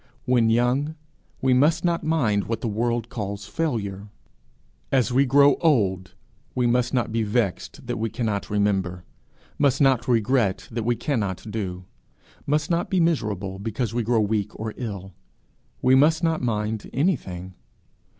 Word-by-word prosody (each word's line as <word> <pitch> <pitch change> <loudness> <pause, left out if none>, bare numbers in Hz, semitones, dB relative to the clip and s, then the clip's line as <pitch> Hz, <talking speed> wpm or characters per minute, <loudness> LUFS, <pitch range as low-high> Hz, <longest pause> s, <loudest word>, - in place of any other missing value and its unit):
When 120 -3 +3
young 125 +7 +1 0.5
we 130 -1 +4
must 155 +7 +3
not 170 -1 +1
mind 120 -11 +1
what 115 -1 -3
the - - -2
world 115 +2 -1
calls 100 -3 -5
failure; 105 - -3 0.8
as 130 -2 +2
we 135 +2 +4
grow 140 +1 +5
old, 95 - +1 0.4
we 125 - +1
must 120 0 +2
not 120 -4 0
be 115 +1 0
vexed 105 -2 -2
that - - -3
we 115 0 -1
cannot 105 -2 -2
remember, 95 -4 0 0.6
must 140 -2 +3
not 130 -3 +3
regret 110 -5 +1
that 115 -1 -3
we 120 0 +2
cannot 110 -10 -2
do, 95 -4 -4 0.6
must 150 +3 0
not 170 +1 0
be 190 - +1
miserable 105 - 0
because 115 +2 -3
we 120 - 0
grow 115 0 +2
weak 105 -1 -1
or 110 0 -4
ill: 100 -6 -6 0.7
we 130 - +5
must 155 +5 +4
not 165 -1 +1
mind 110 -2 -2
anything. 95 - -1
115 Hz, 150 wpm, -24 LUFS, 100-135 Hz, 0.8 s, grow